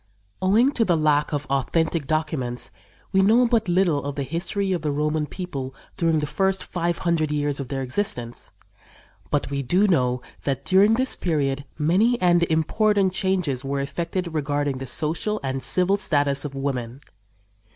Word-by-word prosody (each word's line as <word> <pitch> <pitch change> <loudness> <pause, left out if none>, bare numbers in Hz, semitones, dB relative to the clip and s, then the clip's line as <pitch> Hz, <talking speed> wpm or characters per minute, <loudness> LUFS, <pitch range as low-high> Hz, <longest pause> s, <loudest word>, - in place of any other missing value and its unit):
Owing 220 +8 +4
to 240 - +2
the 175 -6 +2
lack 150 -1 +2
of 145 -1 -2
authentic 150 +3 0
documents 150 -6 -2 0.4
we 190 - +4
know 225 +6 +5
but 230 -3 +1
little 175 -5 +2
of 140 0 -4
the 140 - -2
history 175 +7 -2
of 175 - -2
the 150 - -1
Roman 150 +1 0
people 135 -9 -6 0.2
during 165 -2 +1
the 150 - 0
first 190 +5 0
five 170 -1 -2
hundred 160 -3 +1
years 145 -1 -1
of 135 - -4
their 135 0 -3
existence, 125 - -3 0.8
but 145 -1 -1
we 140 0 -1
do 180 +10 +2
know 125 -8 +1 0.2
that 140 -1 -2
during 200 +4 +5
this 260 +2 +1
period 140 -5 -1
many 190 +11 +2
and 175 -1 +4
important 190 +4 +2
changes 180 -10 0
were 140 0 -2
effected 170 +5 -3
regarding 145 -2 -1
the 135 - -6
social 170 - -1
and 135 0 -2
civil 185 +9 +2
status 145 -6 +1
of 140 -1 -6
women. 135 -2 -3
155 Hz, 165 wpm, -24 LUFS, 140-185 Hz, 0.8 s, know